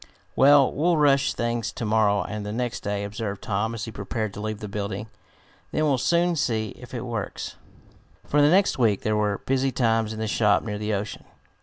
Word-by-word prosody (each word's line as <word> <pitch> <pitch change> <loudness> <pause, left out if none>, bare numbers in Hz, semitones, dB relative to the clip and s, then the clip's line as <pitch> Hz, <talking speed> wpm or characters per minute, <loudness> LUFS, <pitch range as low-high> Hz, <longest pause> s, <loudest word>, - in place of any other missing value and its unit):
"Well, 140 0 +6
we'll 170 +3 +2
rush 140 -2 +3
things 120 -1 -1
to 115 - -4
morrow 105 -2 +2
and 105 +2 -5
the 105 - -4
next 120 +1 -2
day," 100 0 -3
observed 100 -1 -5
Tom 110 +3 -1
as 110 - -4
he 115 - -7
prepared 105 +1 -4
to 105 - -7
leave 110 0 -3
the 105 - -6
building. 100 +1 -4 0.6
"Then 155 - 0
we'll 140 -4 +2
soon 170 +5 +2
see 115 -6 0
if 125 +3 -11
it 120 - -4
works." 115 -5 -5 0.7
For 145 - +2
the 145 - +6
next 190 -3 +3
week 110 -5 +2
there 110 0 +1
were 105 -1 +1
busy 135 0 +1
times 115 -3 +1
in 110 - -6
the 110 - -2
shop 105 -1 +2
near 105 -2 -4
the 105 0 -1
ocean. 105 +2 -5
110 Hz, 205 wpm, -25 LUFS, 105-130 Hz, 0.7 s, Well